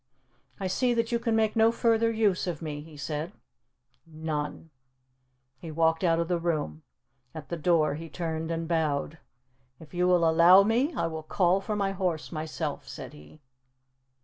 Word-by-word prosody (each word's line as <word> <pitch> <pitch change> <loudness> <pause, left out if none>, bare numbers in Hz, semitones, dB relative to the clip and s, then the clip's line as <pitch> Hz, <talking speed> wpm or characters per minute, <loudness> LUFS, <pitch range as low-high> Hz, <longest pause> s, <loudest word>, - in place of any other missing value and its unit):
"I 195 - -3
see 240 +6 +1
that 230 0 0
you 235 - +1
can 230 -1 0
make 220 0 +1
no 225 0 +5
further 230 -1 +2
use 210 -5 +1
of 170 -4 -3
me," 150 -2 -5
he 155 0 -13
said. 150 +5 -4 0.7
"None." 155 0 -5 0.9
He 165 - -8
walked 160 +2 +1
out 165 -2 +3
of 170 - 0
the 175 -1 0
room. 150 - -2 0.5
At 155 -2 -8
the 170 - -2
door 160 -2 +2
he 165 +2 -7
turned 160 -1 -4
and 165 0 -3
bowed. 160 -1 -1 0.6
"If 160 0 -15
you 180 0 +1
will 175 -2 +4
allow 170 +4 +7
me, 240 +9 +1
I - - 0
will 160 -1 -4
call 180 +4 +1
for 210 +2 -3
my 200 -1 0
horse 180 -5 -2
myself," 155 -1 -4
said - - -8
he. 75 - -16
165 Hz, 175 wpm, -28 LUFS, 160-195 Hz, 0.9 s, allow